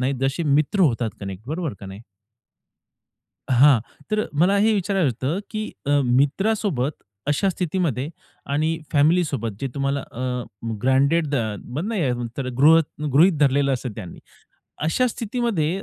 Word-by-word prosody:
नाहीत, 135 +2 0
जसे 135 +5 0
मित्र 150 +6 +2
होतात 120 -8 +2
कनेक्ट. 95 0 -6
बरोबर 160 -3 -2
का 100 - -8
नाही? 95 +3 -9 1.5
हां, 130 -1 +6 0.3
तर 215 0 +1
मला 180 +7 +3
हे 215 +2 +3
विचारायचं 190 -5 +1 0.2
होतं, 165 +7 0
की 215 0 -3 0.2
अ, - - 0
मित्रासोबत 145 - +1 0.3
अशा 150 +7 +1
स्थितीमध्ये 165 -7 -1 0.4
आणि 160 +3 0
फॅमिलीसोबत 145 - +2
जे 135 - -2
तुम्हाला 140 0 -1
अ, 125 -1 -4 0.4
ग्रँटेड 140 +5 +3
ध - - -1
अ, 110 -5 -1
बघ 145 +9 -4
ना, 225 +1 -3
हे 145 -11 +1 0.2
तर 130 -2 -3
गृहत 160 +2 +6 0.2
गृहीत 160 +2 +5
धरलेलं 140 0 +3
असतं 125 -1 -3
त्यांनी. 90 -6 -8 0.7
अशा 250 +10 +2
स्थितीमध्ये 210 -7 -1
145 Hz, 145 wpm, -23 LUFS, 130-180 Hz, 1.5 s, हां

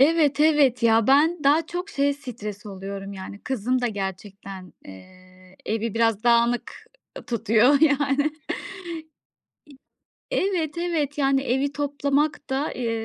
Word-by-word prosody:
Evet, 295 -1 +4
evet, 295 -6 +4
ya. 225 -1 +4
Ben 305 +6 +4
daha 300 +3 +4
çok 355 +4 -5
şeye 285 -7 +1
stres 230 -7 -8
oluyorum: 195 0 -7
Yani 195 +1 -8
kızım 255 0 -1
da 245 - 0
gerçekten, 195 -2 -6
eee, 185 - -16
evi 225 0 -2
biraz 225 -1 +1
dağınık, 235 0 +2 0.4
eee, - - -7
tutuyor 230 +4 +3
yani. 285 -1 +2 2.0
Eee, - - +1 0.2
evet, 320 -2 -2
evet. 320 -4 -1
Yani 270 -1 +2
evi 270 +2 0
toplamak 285 0 -1
da, 270 +3 -1
eee, 240 -2 -2
255 Hz, 130 wpm, -24 LUFS, 210-290 Hz, 2.0 s, Evet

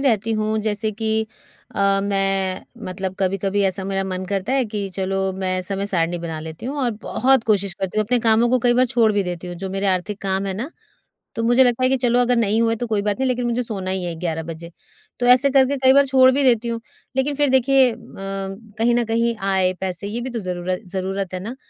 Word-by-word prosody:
रहती 225 -5 +1
हूँ 215 0 0
जैसे 215 0 -1
कि 220 +1 -1 0.5
अ, 195 0 +2
मैं 195 -1 0 0.2
मतलब 190 0 -4
कभी-कभी 195 +1 0
ऐसा 190 0 -1
मेरा 195 0 -1
मन 185 0 -4
करता 200 +5 -2
है 270 -2 +2
कि 210 -1 -4
चलो 190 0 -1
मैं 185 -1 -2
समय 195 +1 -3
सारिणी 175 -2 0
बना 165 -2 -5
लेती 160 +8 -8
हूँ 285 +3 -4
और 245 - +1
बहुत 265 -2 +2
कोशिश 200 -3 +1
करती 190 +2 -3
हूँ 215 - +2
अपने 245 +3 +1
कामों 225 +1 +3
को 255 - +3
कई 240 - +5
बार 255 +1 +4
छोड़ 235 -3 +3
भी 205 -1 +1
देती 180 -1 -5
हूँ, 175 - -6
जो 190 +1 -5
मेरे 195 +1 -2
आर्थिक 190 +2 -1
काम 195 0 -1
हैं 190 - -2
ना, 245 - -5 0.6
तो 230 - -2
मुझे 245 +3 +5
लगता 245 +1 +1
है 255 - +4
कि 265 - +3
चलो 245 -1 +2
अगर 245 0 +2
नहीं 220 0 +2
हुए 225 0 +1
तो - - 0
कोई 215 -2 0
बात 205 +3 -1
नहीं, 265 -1 +1
लेकिन 245 -1 -1
मुझे 240 +1 0
सोना 195 -5 -4
ही 190 -1 -2
है 170 -1 -3
11 165 -2 -2
बजे, 170 +1 -8 0.5
तो 245 - +1
ऐसे 255 +3 +6
करके 270 +1 +3
कई 260 0 +5
बार 280 0 +5
छोड़ 260 -1 +6
भी 280 +2 +1
देती 235 -2 +3
हूँ, 230 0 -3 0.4
लेकिन 280 +2 +1
फिर 290 0 +2
देखिए 265 0 +4
अ, - - -9 0.2
कहीं 195 +4 -3
न 240 0 +2
कहीं 230 +1 0
आय, 190 -2 +1
पैसे 190 +1 -3
ये 230 +3 -4
भी 255 +2 -4
तो 235 -2 -4
ज़रूर 180 -1 -4
ज़रूरत 190 0 -4
है 180 - -3
ना, 230 +7 -6
210 Hz, 240 wpm, -21 LUFS, 190-240 Hz, 0.6 s, ऐसे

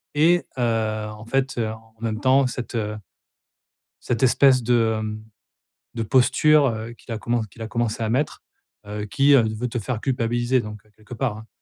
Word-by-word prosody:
Et, 170 +4 +4
heu, 110 -2 0
en 105 +1 -11
fait, 135 +3 -1
heu, 110 -2 0
en 110 0 -11
en - - -23
même 110 -2 -2
temps 130 +2 +4
cette, 125 -1 -6
heu 105 -1 -2 1.1
cette 120 -1 -2
espèce 130 0 +5
de, 115 -1 +2
hem, 110 0 -5 0.7
de 115 - -2
posture, 135 +5 +4
heu, 110 -1 -3
qu'il 120 0 -9
a - - -3
commenc 120 0 -1
qu'il 115 - -14
a 110 - -4
commencé 115 -1 -1
à 110 - -1
mettre, 135 +6 -1 0.4
heu, 105 0 -5
qui, 140 +7 +2
heu, 135 -4 +6
veut 125 +3 -3
te 120 - -3
faire 115 0 -4
culpabiliser, 120 0 0
donc, 105 -2 -8
quelque 110 +2 -13
part, 120 -3 -2
hein. 110 +1 -12
115 Hz, 190 wpm, -23 LUFS, 110-130 Hz, 1.1 s, heu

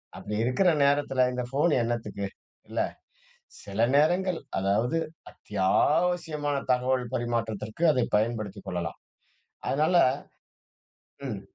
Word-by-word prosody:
அப்படி 105 - -6
இருக்கிற 125 +10 +2 0.2
நேரத்தில 140 -2 +3
இந்த 125 0 -2
ஃபோன் 150 +4 +2
என்னத்துக்கு? 110 -4 -2 0.4
இல்ல. - - -3 0.8
சில 100 +1 -7 0.2
நேரங்கள் 175 +4 +3 0.2
அதாவது 105 +10 +1 0.3
அத்தியாவசியமான 150 - +1 0.2
தகவல் 125 -1 +1
பரிமாற்றத்திற்கு 115 +3 -2
அதை 125 -3 +2
பயன்படுத்திக் 110 -3 -2
கொள்ளலாம். 85 -1 -4 0.7
அதனால 155 +6 +2 1.3
ம். 105 -5 -4
125 Hz, 95 wpm, -27 LUFS, 110-150 Hz, 1.3 s, நேரத்தில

